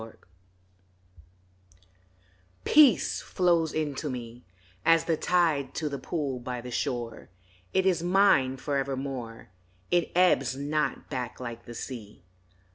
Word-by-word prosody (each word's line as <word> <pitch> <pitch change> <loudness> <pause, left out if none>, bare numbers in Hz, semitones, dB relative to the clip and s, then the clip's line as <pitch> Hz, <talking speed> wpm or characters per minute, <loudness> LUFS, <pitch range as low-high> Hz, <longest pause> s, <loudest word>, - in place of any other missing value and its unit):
PEACE 110 0 -11 2.5
PEACE 290 -8 +5
flows 170 -3 +1
into 150 -1 -2
me 120 -1 -7 0.4
AS 165 0 +4
the 165 - +1
tide 155 -6 +1
to 155 -2 -2
the 140 -1 -5
pool 140 -2 -3
by 125 0 -5
the 125 +1 -8
shore; 120 -2 -3 0.4
It 190 - +1
is 180 -4 +2
mine 175 -8 +3
forevermore, 135 -5 -4 0.4
It 175 -1 +2
ebbs 155 -8 +3
not 150 +2 -2
back 125 -3 -4
like 120 -2 -7
the 120 - -9
sea. 110 -7 -8
140 Hz, 120 wpm, -28 LUFS, 125-165 Hz, 2.5 s, PEACE